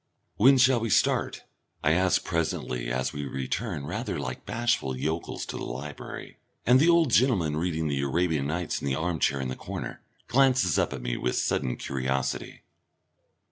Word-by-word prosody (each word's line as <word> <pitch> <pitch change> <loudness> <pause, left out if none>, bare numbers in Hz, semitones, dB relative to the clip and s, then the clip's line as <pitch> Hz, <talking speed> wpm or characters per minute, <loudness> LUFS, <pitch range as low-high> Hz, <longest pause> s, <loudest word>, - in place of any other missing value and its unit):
"When 135 +5 +6
shall 130 -1 +5
we 115 0 -2
start?" - - +1 0.4
I 75 - +4
ask 90 +3 +3
presently, 65 -7 -2
as 65 +1 -1
we 75 - -4
return, 70 - -3
rather 105 - -3
like 65 -3 -5
bashful 120 - 0
yokels, 80 +5 -3
to - - -6
the - - -5
library, 70 +4 -7 0.3
and 125 +2 +6
the 160 +5 +5
old 170 -5 +4
gentleman 105 - +3
reading 80 -1 -1
the 70 -2 -1
Arabian 75 0 0
Nights 85 +2 -2
in - - -3
the 65 - +1
armchair 80 -3 0
in 65 -1 -2
the 65 - -3
corner - - -6 0.3
glances 130 - +3
up - - +1
at 65 -3 -6
me - - -2
with - - -1
a - - -1
sudden 60 - 0
curiosity. 65 0 -3
80 Hz, 175 wpm, -27 LUFS, 70-115 Hz, 0.4 s, When